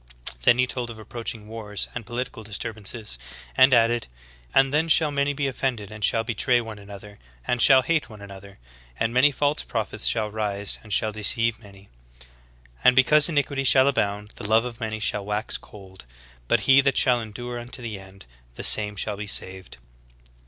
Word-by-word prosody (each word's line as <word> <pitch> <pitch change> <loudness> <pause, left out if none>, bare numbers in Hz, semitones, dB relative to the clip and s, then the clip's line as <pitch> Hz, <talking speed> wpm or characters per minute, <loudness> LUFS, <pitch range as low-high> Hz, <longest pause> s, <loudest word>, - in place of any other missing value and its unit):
"" - - -6
Then 120 - +5
He 125 - +3
told 125 -1 -4
of 115 - -9
approaching 110 -1 -6
wars 105 -2 -5
and 120 -3 -7
political 120 -1 -5
disturbances, 105 - -3 0.4
and 130 +1 +6
added 120 - +3 0.4
"And 135 0 +3
then 155 +2 +2
shall 155 -2 +4
many 140 0 0
be 145 0 -3
offended 125 -6 -3
and 110 -1 -8
shall 115 +3 +2
betray 120 +1 +1
one 110 -3 -8
another, 100 0 -12 0.3
and 120 - -1
shall 130 -2 +6
hate 160 +1 0
one 110 -2 -12
another. 100 0 -12 0.4
And 115 +1 0
many 130 +4 +5
false 145 +2 0
prophets 110 -2 -2
shall 110 -2 0
rise 105 -2 -1
and 110 - -14
shall 110 +2 +1
deceive 110 +2 -1
many. 100 -2 -16 1.0
And 125 - +6
because 145 +4 +5
in 155 - -2
iquity 140 -1 0
shall 130 0 +5
abound, 105 -6 -1
the - - -8
love 110 +2 +3
of 120 -2 -7
many 110 -1 -4
shall 105 -1 -1
wax 105 +2 -2
cold. 95 -5 -11 0.4
But - - +2
he 135 0 +6
that 135 0 0
shall 125 -2 +3
endure 120 +3 -7
unto 120 +1 -6
the 110 -4 -5
end 95 0 -15 0.3
the - - -7
same 105 -1 +5
shall 105 +1 -3
be 105 +1 -6
saved. 95 -2 -3
115 Hz, 190 wpm, -24 LUFS, 105-130 Hz, 1.0 s, and